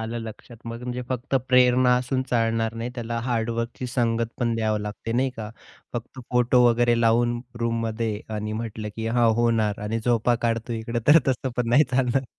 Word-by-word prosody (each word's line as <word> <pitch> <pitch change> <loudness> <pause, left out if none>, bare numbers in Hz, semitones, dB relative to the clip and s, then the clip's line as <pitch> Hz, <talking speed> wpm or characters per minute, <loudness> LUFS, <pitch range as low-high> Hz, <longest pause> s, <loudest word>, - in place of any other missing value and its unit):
आलं 115 +1 -4
लक्षात. 115 +2 -10
मग 115 +1 -6
म्हणजे 125 0 -4
फक्त 130 +1 -3
प्रेरणा 125 0 +5
असून 130 +1 -1
चालणार 115 -1 +1
नाही, 115 +2 -4
त्याला 115 -1 -3
हार्डवर्कची 115 +1 -2
संगत 115 -2 0
पण 120 -2 0
द्यावं 110 -2 0
लागते, 105 +2 -5
नाही 130 +2 +1
का. 110 -1 -6 0.4
फक्त 120 +2 -6
फोटो 125 0 +4
वगैरे 120 0 +3
लावून, 120 +1 +2 0.2
रूममध्ये 115 -2 -1
आणि 105 0 -3
म्हटलं 110 -1 -4
की 110 0 -3
"हां, 115 0 +3
होणार." 115 -2 +1
आणि 110 +2 -2
झोपा 120 0 +2
काढतोय 115 0 -1
इकडं. 115 +1 -3
तर 150 +3 +8
तसं 130 0 0
पण 120 -2 0
नाही 145 +6 +5
चालणार. 130 +1 +1
115 Hz, 175 wpm, -24 LUFS, 115-125 Hz, 0.4 s, तर